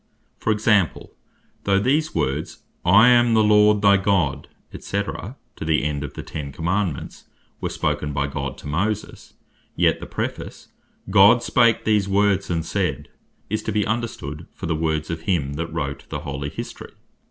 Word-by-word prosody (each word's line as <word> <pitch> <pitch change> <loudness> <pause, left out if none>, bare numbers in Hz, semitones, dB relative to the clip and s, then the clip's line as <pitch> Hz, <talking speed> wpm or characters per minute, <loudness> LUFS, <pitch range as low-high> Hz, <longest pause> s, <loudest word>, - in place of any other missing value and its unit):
For - - -2
example, 105 -4 +1 0.5
though 100 -1 +2
these 145 +9 +1
words, 70 +4 -2 0.2
"I 105 +7 +7
am 120 -1 +5
the 110 - +5
Lord 105 0 +4
thy 100 -1 +6
God, 95 -8 0 0.3
&c." 100 +1 -2
to 105 +4 -7 0.3
the 80 -1 +1
end 75 -1 -2
of 70 - -7
the - - -6
Ten 70 -3 -6
Commandements, 85 +1 -3 0.3
were - - -3
spoken 75 - -2
by 70 0 -1
God 70 -1 -4
to - - -10
Moses; 100 +8 -3 0.4
yet - - +2
the - - -8
Preface, - - -5 0.4
"God 105 +5 +6
spake 115 -3 +3
these 105 -3 +2
words 100 -1 +2
and 85 -2 -1
said," - - -2 0.4
is 110 +2 -2
to 110 - -3
be 105 -1 +1
understood 105 -9 -4
for - - -7
the 85 - 0
Words 80 0 -1
of 80 -1 -4
him 80 -6 -1
that 80 +2 -4
wrote 75 -4 -4
the - - -4
holy 70 0 -4
History. - - -8
95 Hz, 165 wpm, -22 LUFS, 75-105 Hz, 0.5 s, I